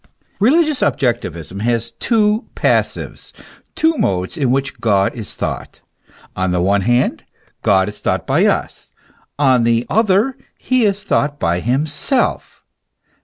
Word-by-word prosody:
Religious 300 +5 +3
objectivism 95 - -1
has 115 0 -1
two 215 - +1
passives, - - -1 0.4
two 320 0 +2
modes 95 - -1
in 140 -6 0
which 135 +2 -1
God 100 -3 +2
is 110 -4 -9
thought. - - -5 0.5
On 95 0 0
the 90 0 0
one 100 +3 +2
hand, 120 +5 +1 0.4
God 95 -1 +3
is 105 - -8
thought - - -1
by - - +2
us, - - -2 0.5
on 130 -4 +3
the 115 +1 +2
other, 220 +4 +2 0.2
he 255 -3 +1
is 200 0 0
thought 145 -6 0
by 85 +1 0
himself. 145 - -1
125 Hz, 130 wpm, -18 LUFS, -, 0.5 s, Religious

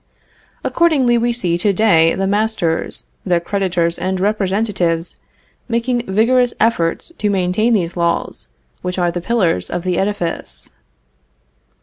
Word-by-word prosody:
Accordingly 275 -8 +2
we 240 +1 +1
see 180 -8 0
to 200 +2 +2
day 170 -6 +4
the 195 - -1
masters, 205 -4 0 0.2
their 175 -2 +1
creditors 175 -2 -1
and 185 0 -1
representatives, 195 -4 -1 0.5
making 240 +1 -1
vigorous 240 +4 +3
efforts 215 - 0
to 210 - +1
maintain 195 +4 +1
these 175 -4 -1
laws, 170 - -2 0.3
which 180 0 -4
are 175 -1 +1
the 175 0 -4
pillars 180 - 0
of 175 - -3
the 180 -2 0
edifice. 195 -4 -3
190 Hz, 125 wpm, -18 LUFS, 175-225 Hz, 0.5 s, day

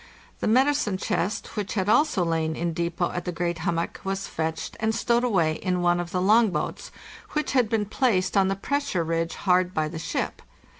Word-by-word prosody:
The - - -1
medicine 260 -3 +3
chest, 190 +1 -2
which 205 0 -3
had 190 -2 0
also 215 - +3
lain 160 -1 0
in 170 0 -2
depot 170 +1 -1
at 175 -1 -4
the 180 - -2
great 170 -1 -2
hummock, 170 0 -2
was 195 0 -2
fetched 160 0 -3
and 220 0 0
stowed 235 +1 +2
away 170 -10 +2
in 180 -2 -1
one 175 0 +3
of 175 -1 -3
the 180 - -1
long 220 +3 +5
boats, 150 -5 -4 0.4
which 300 -2 -1
had 250 -5 +2
been 220 -2 +1
placed 200 -5 +1
on 195 -1 +4
the 195 - 0
pressure 280 -4 -1
ridge 165 +1 -1
hard 180 -1 +2
by 155 -1 +1
the 160 +1 -6
ship. - - -3
185 Hz, 200 wpm, -25 LUFS, 170-220 Hz, 0.4 s, long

